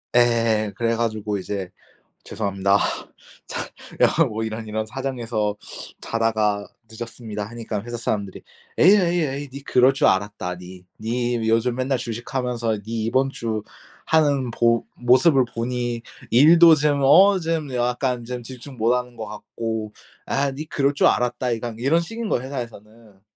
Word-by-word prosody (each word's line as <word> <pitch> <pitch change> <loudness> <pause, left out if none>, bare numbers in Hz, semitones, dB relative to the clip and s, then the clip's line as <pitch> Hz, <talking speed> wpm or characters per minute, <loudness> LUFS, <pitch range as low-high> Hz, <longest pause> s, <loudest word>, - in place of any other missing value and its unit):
예. 115 -3 +3
그래 115 +2 0
가지고 110 -3 -1
이제 95 0 -5 0.5
"죄송합니다. 100 -1 +1 0.7
자 - - -4 0.4
야 165 - +5
뭐 110 -2 -3
이런 110 0 -5
이런 110 0 -2
사정에서 115 -4 -3 0.4
자다가 110 -3 0 0.2
늦었습니다." 110 -2 -6
하니까 110 -1 -5
회사 120 +1 -6
사람들이 105 -4 -3 0.4
"에이, 185 +5 +7
에이, 175 -2 +2
에이, 140 -1 -3
니 140 +1 -9
그럴 130 0 +4
줄 135 - +2
알았다, 95 -2 0
니. 90 0 -12 0.2
니 120 0 -1
요즘 115 +2 +2
맨날 130 +1 -1
주식 120 0 -6
하면서 120 -3 -1
니 110 +2 -4
이번 130 +4 +1
주 110 -5 -3 0.4
하는 145 -5 +2
보 115 0 +2
모습을 130 +3 +4
보니 120 0 -2 0.3
일도 165 +5 +7
좀 145 -1 +1
어 190 +8 +6
좀 160 -4 -2
약간 125 0 -1
좀 125 +1 -5
집중 130 +2 -10
못 115 +2 +3
하는 125 -1 -3
것 110 -1 -6
같고 110 +1 -5 0.3
아 140 0 0
니 150 +4 -6
그럴 140 0 +1
줄 - - +4
알았다, 125 +1 0
이거." 115 0 -3
이런 140 +8 +2
식인 225 +6 -5
거야 120 - 0
회사에서는. 115 -5 -9
120 Hz, 295 characters per minute, -23 LUFS, 110-135 Hz, 0.7 s, 에이